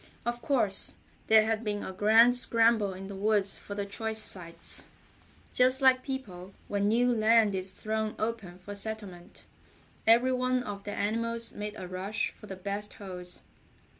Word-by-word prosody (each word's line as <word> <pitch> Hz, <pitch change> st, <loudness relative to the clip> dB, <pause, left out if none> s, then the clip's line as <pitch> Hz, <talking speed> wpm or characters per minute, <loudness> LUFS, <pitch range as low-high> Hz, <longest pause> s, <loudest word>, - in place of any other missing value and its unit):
Of 240 Hz, 0 st, -3 dB
course, 220 Hz, -9 st, +3 dB, 0.3 s
there 220 Hz, 0 st, +6 dB
had 225 Hz, 0 st, -1 dB
been 205 Hz, -2 st, -3 dB
a 190 Hz, -, -6 dB
grand 225 Hz, +5 st, +5 dB
scramble 230 Hz, -4 st, +3 dB
in 190 Hz, +1 st, -8 dB
the 200 Hz, -, -8 dB
woods 205 Hz, 0 st, 0 dB
for 205 Hz, -, -9 dB
the 200 Hz, 0 st, -3 dB
choice 220 Hz, +2 st, -1 dB
sites. 180 Hz, -6 st, +2 dB, 0.7 s
Just 255 Hz, +1 st, +5 dB
like 260 Hz, -1 st, +5 dB
people 195 Hz, -9 st, -7 dB
when 200 Hz, 0 st, 0 dB
new 245 Hz, +3 st, +2 dB
land 220 Hz, -1 st, +3 dB
is 185 Hz, 0 st, -4 dB
thrown 215 Hz, +2 st, -3 dB
open 215 Hz, -5 st, -4 dB
for 185 Hz, +3 st, -9 dB
settlement, 200 Hz, -4 st, -7 dB, 0.6 s
every 240 Hz, +3 st, +5 dB
one 255 Hz, 0 st, 0 dB
of 200 Hz, -3 st, -7 dB
the 205 Hz, -, -4 dB
animals 230 Hz, +3 st, -3 dB
made 210 Hz, 0 st, -6 dB
a 185 Hz, -, -7 dB
rush 190 Hz, +4 st, -3 dB
for 210 Hz, -, -15 dB
the 190 Hz, -, -7 dB
best 200 Hz, +2 st, -6 dB
holes. 180 Hz, -3 st, -8 dB
215 Hz, 165 wpm, -29 LUFS, 200-230 Hz, 0.7 s, there